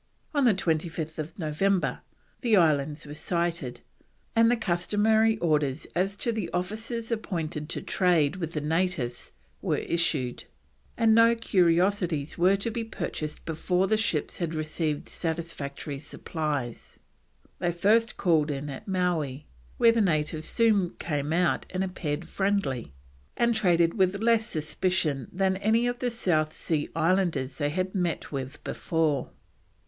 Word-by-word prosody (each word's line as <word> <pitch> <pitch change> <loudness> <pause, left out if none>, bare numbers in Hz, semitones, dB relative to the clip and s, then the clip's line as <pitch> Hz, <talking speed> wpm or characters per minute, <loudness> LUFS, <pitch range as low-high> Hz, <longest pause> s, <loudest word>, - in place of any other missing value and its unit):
On 285 -3 +3
25th 160 -4 -1
November 180 +3 0 0.4
the 230 -4 +4
islands 150 -3 +2
were 145 - -8
sighted, 170 -5 -2 0.5
and 230 0 +6
the 245 - +3
customary 215 +3 +2
orders 150 -5 0
as 195 +3 0
to 235 - -1
the 215 -7 -3
officers 220 +6 -3
appointed 165 -8 -3
to - - -3
trade 175 -3 +2
with 165 -2 -4
the 150 - -2
natives 150 - -1 0.3
were - - 0
issued, 150 -7 0 0.5
and 225 -1 +4
no 230 +1 +6
curiosities 180 -6 +2
were 185 +3 +4
to 200 +4 -2
be 230 0 -2
purchased 155 -8 -5
before 180 +3 0
the 215 - +2
ships 205 -9 -1
had 165 -2 -2
received 155 -1 -2
satisfactory 160 -4 -4
supplies. 145 -4 -4 0.6
They 175 -1 +1
first 215 +6 +2
called 160 -4 +2
in 145 0 -3
at 135 - -9
Mowee, 165 -7 -1 0.3
where 230 - +6
the 230 -1 +2
natives 155 -4 0
soon 210 -6 +2
came 145 -2 -2
out 175 +1 +1
and 185 0 -1
appeared 165 -3 -3
friendly, 190 - -1 0.5
and 235 0 +3
traded 175 -6 +3
with 190 -1 +2
less 225 0 +3
suspicion 155 - -1
than 190 0 +1
any 220 +4 +2
of 245 0 -1
the 250 - 0
South 160 -9 +1
Sea 155 -3 -2
Islanders 165 -6 +1
they 145 -1 +1
had 185 +4 -2
met 180 -4 -2
with 135 0 -5
before. 155 -5 0
175 Hz, 140 wpm, -27 LUFS, 155-200 Hz, 0.6 s, and